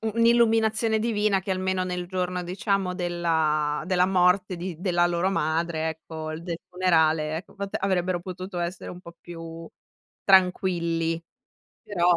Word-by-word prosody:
un'illuminazione 225 -1 +3
divina, 210 -3 +1
che 190 - -6
almeno 185 0 0
nel 180 -1 -3
giorno, 180 -1 -2
diciamo, 185 +1 -1
della 160 -4 0
della 180 -1 +3
morte 185 0 +3
di 175 -1 -5
della 175 -2 +2
loro 175 +2 0
madre, 160 -1 0
ecco, 160 0 -6
del 170 -1 -5
funerale, 160 -4 +2
ecco, 180 - -13
vat 200 -1 -6
avrebbero 185 -2 0
potuto 185 0 -6
essere 175 +1 -4
un 180 - -9
po' 170 -2 -12
più 165 -1 -9 0.6
tranquilli 170 -3 +2 0.6
però 205 -6 -2
180 Hz, 135 wpm, -26 LUFS, 170-190 Hz, 0.6 s, un'illuminazione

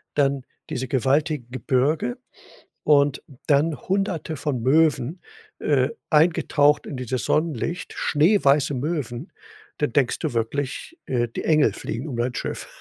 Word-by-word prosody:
dann 140 -2 +1 0.3
diese 130 -4 -3
gewaltigen 140 0 0
Gebirge 130 +1 0 0.7
und 145 -2 +3 0.2
dann 150 +2 +3
Hunderte 185 -5 -1
von 130 -4 -2
Möwen, 155 +3 +2 0.4
äh, - - +2 0.2
eingetaucht 150 -2 +3
in - - -6
dieses 125 -3 -3
Sonnenlicht 165 +2 -1
schneeweiße 150 -4 +3
Möwen. 140 - -3 0.5
Dann 145 -5 0
denkst 135 -4 +2
du - - -2
wirklich, 135 - -3
äh, 120 -2 0
die - - -5
Engel 150 -9 +3
fliegen 120 +7 -5
um 125 -6 -5
dein 120 +1 -1
Schiff. - - -4
145 Hz, 125 wpm, -23 LUFS, 125-155 Hz, 0.7 s, und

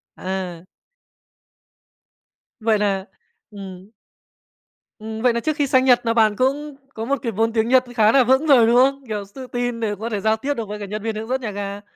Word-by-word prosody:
À. 185 -2 -5 1.9
Vậy 220 -1 +2
là 195 -2 0 0.5
ừm. 190 -1 -10 1.1
Ừm, 220 0 -6
vậy 245 0 +3
nà 235 - 0
trước 310 +6 -1
khi 290 -2 0
sang 260 0 +3
Nhật 245 -2 +4
nà 230 - +2
bạn 220 -2 +3
cũng 280 +4 -1 0.2
có 225 -1 -5
một 280 +3 0
cái 230 - -2
vốn 225 +2 0
tiếng 225 -1 +1
Nhật 260 0 +5
khá 220 -2 +5
là 265 +1 +5
vững 265 +5 +3
rồi, 250 -6 +6
đúng 235 - +3
không? 275 +2 +3
Kiểu 210 -2 -4
s 195 - -24
tự 260 -1 -8
tin 245 -1 -3
để 215 -2 -2
có 225 +2 -4
thể 210 -3 -2
giao 220 +2 +2
tiếp 280 +6 -2
được 230 -5 -5
với 210 0 -5
cả 205 - -5
nhân 210 +1 -6
viên 225 -1 -2
hướng 220 +1 -5
dẫn 260 +2 -1
nhà 225 -4 -4
ga. 200 0 -5
225 Hz, 220 wpm, -21 LUFS, 210-255 Hz, 1.9 s, rồi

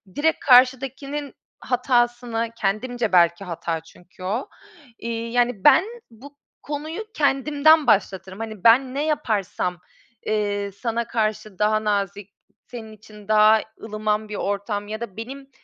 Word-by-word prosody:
direkt 320 +2 +1
karşıdakinin 270 +2 +2 0.3
hatasını, 240 -2 0
kendimce 225 +3 -1
belki 175 0 +4
hata 170 -1 -3
çünkü 175 +3 -17
o, 210 +8 -3 0.5
iii, 230 0 -4
yani, 245 -5 +1
ben 295 +3 +7 0.3
bu 275 +6 -15 0.3
konuyu 305 +6 -5
kendimden 295 +1 +3
başlatırım. 190 -1 +1
Hani, 220 -4 -7
ben 255 +3 +5
ne 285 - 0
yaparsam, 210 - -1 0.5
eee, 205 -1 -1
sana 230 +3 -3
karşı 215 -3 -2
daha 215 +1 +2
nazik, 200 -1 -2 0.3
senin 225 -3 -9
için 210 -1 -15
daha 215 0 +5 0.2
ılıman 215 0 -2
bir 210 - -5
ortam 205 +1 -3
ya 215 +2 -6
da 225 -5 -7
benim 270 +4 -8
225 Hz, 125 wpm, -23 LUFS, 205-255 Hz, 0.5 s, ben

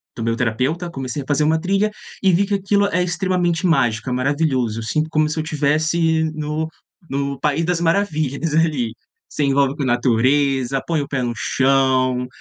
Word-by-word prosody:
do 115 - -6
meu 115 0 0
terapeuta, 130 +9 -1
comecei 135 0 -4
a - - -16
fazer 145 0 +1
uma 160 +1 +2
trilha 195 +3 +1 0.3
e 190 -2 +4
vi 200 +4 +3
que 205 - -3
aquilo 200 +1 +1
é 180 -2 0
extremamente 180 -1 0
mágico, 130 -7 +1
é - - -1
maravilhoso, 130 -4 0
eu 115 - -5
sinto 155 +7 -1
como 155 -1 +1
se 155 - -4
eu - - -1
estivesse 160 +2 +1
no 155 +1 -3 0.4
no 140 0 -2
país 150 +2 0
das 175 -1 0
maravilhas 165 -4 0
ali, 150 -8 +1 0.4
se - - -4
envolve 140 0 +2
com 145 - -3
a - - -1
natureza, 130 +2 +2
põe 160 -3 0
o 140 - -5
pé 130 -3 -2
no 120 -1 -1
chão, 130 0 +1
150 Hz, 190 wpm, -20 LUFS, 130-165 Hz, 0.4 s, e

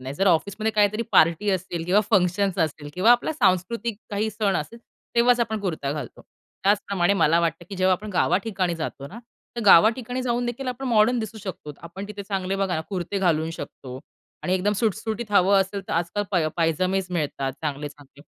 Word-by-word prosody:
नाही, 130 +2 -6
जर 195 +6 0
ऑफिसमध्ये 200 +6 +1
काहीतरी 210 +1 +2
पार्टी 165 +6 +4
असतील 175 -3 -2
किंवा 190 +4 +4
फंक्शन्स 190 -1 +2
असतील 145 -1 -7
किंवा 200 +6 +4
आपला 245 +6 +3
सांस्कृतिक 210 - 0
काही 210 +2 -1
सण 205 -3 0
असेल, 230 +10 -5 0.4
तेव्हाच 240 +1 +4
आपण 220 -2 -1
कुर्ता 155 -7 -2
घालतो. 150 - -7 0.4
त्याचप्रमाणे 200 -2 +2
मला 170 -2 +3
वाटतं, 165 +1 -2
की 195 - -7
जेव्हा 185 0 +3
आपण 205 +3 -3
गावाठिकाणी 185 0 0
जातो 140 -3 -5
ना 215 +10 -10 0.4
तर - - -2
गावाठिकाणी 235 +7 +5
जाऊन 245 -1 -1
देखील 255 +2 -4
आपण 250 +2 -5
मॉडर्न 235 +1 +3
दिसू 220 0 -5
शकतो. 185 -7 -7
आपण 170 +4 -8
तिथे 205 -1 -7
चांगले 195 -1 -2
बघा 195 -2 0
ना, 160 - -1
कुर्ते 190 +1 -3
घालू 160 -3 +1
शकतो 130 -5 -8 0.4
आणि 185 - 0
एकदम 200 +3 +1
सुटसुटीत 220 +1 -2
हवं 195 0 +5
असेल 195 +1 -2
तर - - -3
आजकाल 175 +5 -1
पाय 170 -5 +1
पायजामेच 185 +3 +1
मिळतात, 140 -5 -2
चांगले-चांगले. 145 -1 -6
195 Hz, 180 wpm, -24 LUFS, 170-215 Hz, 0.4 s, गावाठिकाणी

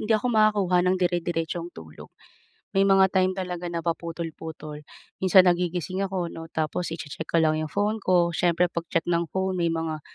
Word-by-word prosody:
hindi 215 - -5
ako 215 - -3
makakuha 205 -5 +3
ng 185 - +2
dire-diretsong 175 -1 -1
tulog. 80 -1 -11 0.7
May 195 0 +3
mga 195 0 +6
time 185 -1 +2
talaga 180 -2 -4
na 170 0 -4
paputol-putol 160 -2 -5 0.4
minsan 185 0 +6
nagigising 180 +1 0
ako 190 -2 -2
'no 165 -1 -8
tapos 160 +2 -2
i-che-check 160 -1 -7
ko 170 - +1
lang 155 -1 +3
'yong 155 - -4
phone 205 +5 0
ko 175 -2 +3
siyempre 175 +1 +2
pag-check 165 -1 -2
ng 170 -1 0
phone 190 0 -1
may 170 - +2
mga 160 -1 -3
175 Hz, 170 wpm, -25 LUFS, 165-185 Hz, 0.7 s, mga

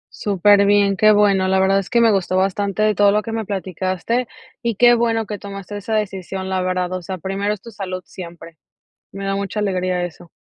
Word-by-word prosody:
Súper 200 0 +3
bien, 200 -1 +3
qué 215 +3 +5
bueno. 200 -2 +3
La 190 0 +2
verdad 195 +1 +3
es 195 - -6
que 240 - +2
me 230 -2 +5
gustó 185 -1 0
bastante 200 +2 +1
todo 205 0 +4
lo 210 +1 +1
que 225 - -6
me 225 -1 -3
platicaste, 190 +4 -2 0.3
y 235 -2 -1
qué 240 +3 +6
bueno 230 -1 +1
que 210 -1 -6
tomaste 200 0 -8
esa 210 +2 -3
decisión, 190 -2 -3
la 190 -1 -1
verdad. 185 0 -1
O 185 - -3
sea, 185 +2 -6
primero 195 +3 -2
es 210 -2 -4
tu 230 - -11
salud 185 -3 -6
siempre. 170 -2 -10 0.6
Me 195 0 -7
da 195 - -1
mucha 200 +1 -3
alegría 185 -3 -1
eso. 175 0 -9
195 Hz, 215 wpm, -20 LUFS, 185-210 Hz, 0.6 s, qué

